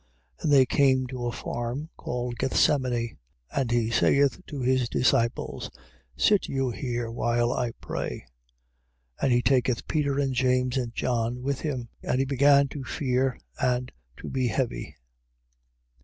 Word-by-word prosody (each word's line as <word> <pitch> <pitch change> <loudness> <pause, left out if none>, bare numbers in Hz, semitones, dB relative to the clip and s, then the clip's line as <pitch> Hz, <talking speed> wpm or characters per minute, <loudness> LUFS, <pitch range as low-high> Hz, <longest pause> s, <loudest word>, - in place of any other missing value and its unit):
14:32. - - -16
And 150 - +2
they 135 -2 +7
came 130 0 +3
to 125 -1 -4
a - - -1
farm 120 +6 -4
called 120 0 -4
Gethsemani. 125 -4 +1 0.3
And 135 -4 -1
he 115 -1 +1
saith 140 +5 +3
to 145 - -6
his 130 -1 +1
disciples: 115 -2 0 0.5
Sit 205 -2 +3
you 135 -2 -1
here, 120 -2 -3
while 120 +1 +1
I 120 -2 -1
pray. - - -5 0.9
14:33. - - -16
And 130 - +3
he 120 - +3
taketh 125 -1 +1
Peter 145 -3 0
and 135 -2 +1
James 125 0 +1
and 120 -3 -2
John 120 0 -1
with 140 0 -1
him: 130 -7 -3
and - - -1
he 135 - +2
began 140 +1 +4
to 140 -1 -6
fear 130 -1 0 0.2
and 125 0 0 0.3
to - - -8
be 130 -2 0
heavy. 115 - -2
125 Hz, 155 wpm, -27 LUFS, 120-135 Hz, 0.9 s, they